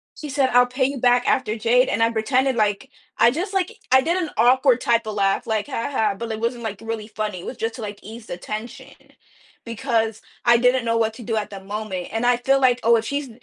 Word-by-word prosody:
She 300 - -8
said, 270 -1 +1
"I'll 245 0 +6
pay 255 +1 0
you 275 +1 -2
back 245 0 +3
after 240 -5 +1
Jade," 240 +3 +2
and 225 - +1
I 230 - +2
pretended 255 +4 +1
like 215 +4 0 0.3
I 235 +1 +5
just, 360 +8 -3
like 380 -2 0 0.2
I 260 0 +6
did 335 +6 0
an 325 - -3
awkward 255 +2 +4
type 230 -2 +1
of 215 - -4
laugh, 195 -1 0
like, 220 +1 -1
"Haha," 230 -5 -1
but 230 +2 -5
it 220 - -4
wasn't, 235 +1 -2
like, 215 -3 -5
really 225 -1 -5
funny, 215 -4 -4
it - - -10
was 260 - -7
just 225 0 -3
to, 230 - -8
like, 205 -1 -6
ease 220 +2 -10
the 175 - -6
tension 215 +6 -7 0.7
because 225 -2 -1 0.2
I 235 0 +6
didn't 250 0 +2
know 230 0 +1
what 225 -1 +1
to 240 - -10
do 225 0 -2
at 210 -1 -2
that 195 -1 -10
moment, 200 -3 -5
and 225 +2 -2
I 245 -1 +4
feel 270 +2 +2
like, 250 -2 +3
"Oh, 235 +1 +5
if 225 -1 0
she's" 280 +2 -3
230 Hz, 245 wpm, -22 LUFS, 220-255 Hz, 0.7 s, I'll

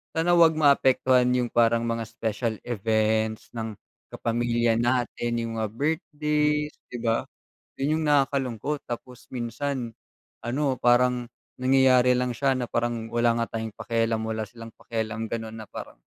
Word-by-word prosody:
sana 165 +2 +2
wag 165 -2 +6
maapektuhan 130 -4 +4
yung 125 -1 +1
parang 115 0 +3
mga 115 0 -1
special 115 0 -2
events 110 -1 0
ng 110 -2 -4 0.4
kapamilya 120 0 +1
natin, 120 -1 0
yung 115 0 -4
mga 110 - 0
birthdays, 150 0 0 0.2
di 125 - -4
ba? 115 -1 +1 0.5
Yun 150 +4 0
yung - - -2
nakakalungkot. 140 -1 +1
Tapos 125 +1 -7
minsan 125 0 -3 0.5
ano, 135 +2 0
parang 125 0 +3 0.3
nangyayari 130 -1 +5
lang 125 0 0
siya 135 -1 +2
na 125 - -1
parang 115 -1 -1
wala 120 0 +2
nga 115 - -4
tayong 110 -1 -5
pakialamm 115 -1 0
wala 110 0 -2
silang 115 +1 -11
pakialam 110 -1 -4
ganun 110 0 -5
na 110 - -7
parang, - - -9
120 Hz, 140 wpm, -26 LUFS, 115-135 Hz, 0.5 s, wag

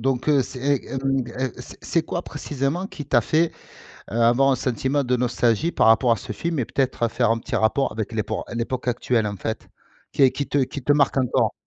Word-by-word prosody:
donc 130 +3 -1
heu, 140 -3 +4
c'est, 125 - -8
et 140 0 0
hem, 135 -1 0
et 130 +2 -3
c'est - - -11
c'est 165 - 0
quoi, 170 +2 -4
précisément, 145 +4 -3
qui 150 -6 -8
t'a 120 -4 +4
fait, 160 +8 +1 0.6
heu, - - -7
avoir 120 +4 +4
un 130 - +2
sentiment 130 +3 -1
de 125 0 +1
nostalgie 120 +3 +1
par - - +3
rapport 115 +2 +5
à - - +2
ce 120 0 -7
film 165 +7 -3
et 130 - +1
peut-être 130 -2 0
faire 120 0 +1
un 115 - +2
petit 115 +1 -4
rapport 110 +6 +1
avec 110 0 -4
l'épor 110 -2 -2
l'époque 120 +2 -3
actuelle, 120 -2 +1
en 100 -1 -4
fait, 110 +4 -5 0.4
qui - - +1
est 130 - +7
qui 140 - -3
te 145 - +1
qui 135 +1 -2
te 145 - +3
marque 145 -1 +2
encore? 130 -2 +1
130 Hz, 225 wpm, -23 LUFS, 115-140 Hz, 0.6 s, est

